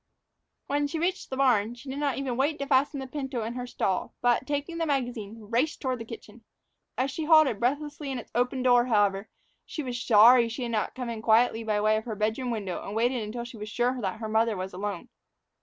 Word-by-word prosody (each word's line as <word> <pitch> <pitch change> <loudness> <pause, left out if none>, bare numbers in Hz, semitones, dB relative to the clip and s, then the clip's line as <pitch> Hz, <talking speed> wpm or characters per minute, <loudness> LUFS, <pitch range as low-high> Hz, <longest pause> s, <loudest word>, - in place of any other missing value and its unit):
When 290 +1 0
she 320 +3 -4
reached 350 +3 -1
the 265 - -4
barn, 240 -4 +2
she 245 +3 -14
did 270 +2 -4
not 285 -3 0
even 270 -3 -2
wait 290 +4 +1
to 280 - -3
fasten 275 +1 +2
the 265 - -5
pinto 265 -3 -4
in 225 +2 -4
her 250 0 -5
stall; 190 -5 -2
but, 245 +1 +2
taking 290 +4 -3
the 330 - 0
magazine, 240 -6 -2
raced 235 +8 -1
toward 255 -2 -2
the 230 - -6
kitchen. 225 0 -11 0.5
As 265 +1 0
she 315 +3 -4
halted 310 -9 +5
breathless 290 +5 -1
in 275 -3 -3
its 240 - -9
open 250 +2 0
door, 245 -1 +4
however, 205 -2 +2 0.3
she 305 - -6
was 245 -2 -4
sorry 235 +2 +7
that - - -4
she 255 - -4
had 235 - -3
not 215 -3 -1
come 250 -2 -4
in 225 -1 -5
quietly 225 +1 +3
by 215 -2 0
way 215 +1 +3
of 220 - -5
her 225 -3 -4
bedroom 220 +5 -1
window 205 -6 -3
and 200 - -6
waited 240 +2 +1
until 220 +3 -5
she 240 -1 -10
was 210 0 -7
sure 245 +3 0
that 195 +1 -2
her 220 - -4
mother 220 0 +1
was 185 0 -5
alone. 200 -1 -5
245 Hz, 235 wpm, -27 LUFS, 220-270 Hz, 0.5 s, sorry